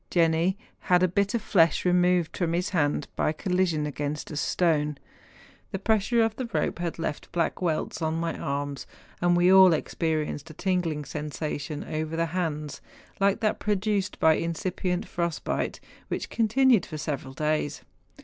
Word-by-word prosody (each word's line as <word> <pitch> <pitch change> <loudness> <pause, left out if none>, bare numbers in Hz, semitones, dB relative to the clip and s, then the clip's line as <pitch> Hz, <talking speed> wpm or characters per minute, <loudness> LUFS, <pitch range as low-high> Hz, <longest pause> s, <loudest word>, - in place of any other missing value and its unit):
Jenni 170 +2 +2 0.3
had 180 0 +5
a - - +5
bit 200 +4 0
of 225 - -1
flesh 165 -7 +3
re¬ 180 - +3
moved 180 -2 +2
from 170 -2 0
his 180 +2 0
hand 145 -6 0
by - - +1
collision 175 -2 0
against 150 +1 -4
a - - -5
stone: 150 0 +1 0.7
the - - -2
pressure 220 +3 +2
of 225 -1 0
the 255 -3 -4
rope - - 0
had 175 -1 -3
left 150 -3 -4
black 170 +1 -1
welts 165 -1 -1
on 160 0 0
my 165 -1 -2
arms; 140 0 -3 0.3
and 175 0 +3
we 180 +2 +5
all 190 -2 +8
experienced 155 -1 -2
a 155 - -11
tingling 170 -6 -1
sensation 150 0 -4
over 155 +1 -3
the 165 0 +1
hands, 155 -5 -3 0.4
like 200 +3 +2
that 215 -1 +1
produced 205 -1 -1
by 160 - +6
incipient 180 +4 -2
frost¬ 170 -3 -3
bite, - - -2 0.3
which - - -4
continued 235 -1 +4
for 155 - -7
several 140 -3 -4
days. 150 0 -1
170 Hz, 165 wpm, -27 LUFS, 155-185 Hz, 0.7 s, all